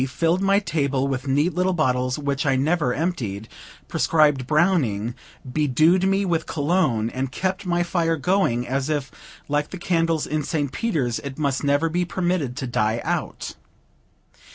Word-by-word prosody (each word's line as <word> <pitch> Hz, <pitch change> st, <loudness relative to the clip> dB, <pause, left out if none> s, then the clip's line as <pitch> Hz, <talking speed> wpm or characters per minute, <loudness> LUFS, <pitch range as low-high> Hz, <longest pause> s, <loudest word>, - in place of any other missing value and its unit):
filled 165 Hz, +7 st, 0 dB
my 195 Hz, 0 st, +3 dB
table 140 Hz, -8 st, 0 dB
with 135 Hz, 0 st, -3 dB
neat 145 Hz, +6 st, +2 dB
little 185 Hz, +1 st, +1 dB
bottles, 125 Hz, -5 st, +1 dB
which 140 Hz, -1 st, -1 dB
I 135 Hz, -2 st, +2 dB
never 150 Hz, 0 st, +1 dB
emptied, 125 Hz, -, -2 dB, 0.4 s
prescribed 145 Hz, -5 st, +2 dB
Browning, 140 Hz, -, +1 dB, 0.3 s
bedewed 155 Hz, +7 st, +2 dB
me 195 Hz, +1 st, +2 dB
with 165 Hz, -3 st, -1 dB
Cologne, 145 Hz, -8 st, +1 dB
and 130 Hz, 0 st, -3 dB
kept 190 Hz, +6 st, -2 dB
my 175 Hz, 0 st, +1 dB
fire 165 Hz, -2 st, 0 dB
going, 145 Hz, -8 st, +1 dB
as 135 Hz, +3 st, -1 dB
if, 145 Hz, -4 st, -2 dB, 0.4 s
like 145 Hz, +1 st, 0 dB
the 185 Hz, -, -7 dB
candles 165 Hz, -3 st, 0 dB
in 155 Hz, 0 st, -1 dB
St. 145 Hz, -2 st, -2 dB
Peter's, 140 Hz, -, -1 dB
it 140 Hz, -2 st, -7 dB
must 140 Hz, -4 st, -1 dB
never 145 Hz, +3 st, +2 dB
be 175 Hz, +2 st, 0 dB
permitted 175 Hz, -7 st, -1 dB
to 135 Hz, -, -3 dB
die 115 Hz, -2 st, 0 dB
out. -, -, -3 dB
150 Hz, 155 wpm, -23 LUFS, 130-175 Hz, 0.4 s, my